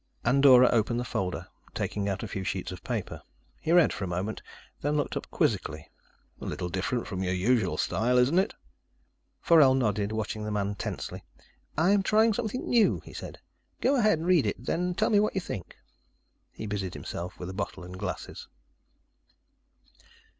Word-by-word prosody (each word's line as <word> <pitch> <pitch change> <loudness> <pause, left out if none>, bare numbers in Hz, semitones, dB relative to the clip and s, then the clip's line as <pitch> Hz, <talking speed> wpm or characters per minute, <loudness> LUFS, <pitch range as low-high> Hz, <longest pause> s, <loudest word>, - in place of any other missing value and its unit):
Andorra 130 -2 +7
opened 120 +1 +1
the - - -1
folder, 90 -5 -3 0.3
taking 100 -1 -2
out 95 - -3
a - - -3
few 95 - -4
sheets 95 -1 -3
of 90 - -9
paper. - - -4 0.4
He 160 - -2
read 175 -2 +5
for 100 - -5
a - - -2
moment, 90 +5 -3 0.4
then 145 +1 0
looked 145 - -1
up - - -5
quizzically. - - -1 0.5
"A - - -6
little 90 - -3
different 95 +7 -2
from 95 -3 -4
your 90 0 0
usual 100 0 +1
style, 125 +4 +1
isn't 130 +8 +4
it?" 195 - 0 0.9
Forell 150 -6 +6
nodded, 105 -5 0
watching 110 0 -3
the 105 - -3
man 105 -1 -1
tensely. 100 - -5 0.5
"I'm 195 +6 +4
trying 220 +3 +4
something 240 +3 -3
new," 230 -3 +3
he - - -13
said. - - -8 0.4
"Go 270 +3 +3
ahead 215 -8 +4
and 165 +2 -4
read 180 -6 +4
it, - - -4
then 180 +1 -1
tell 215 +4 +1
me 205 - +5
what 210 0 +1
you 190 - 0
think." 95 - -7 0.7
He - - -8
busied 100 -3 -3
himself 90 +1 -6
with 90 +1 -6
a - - -9
bottle 95 -1 -4
and 90 +1 -9
glasses. 100 -1 -5
120 Hz, 175 wpm, -28 LUFS, -, 0.9 s, Andorra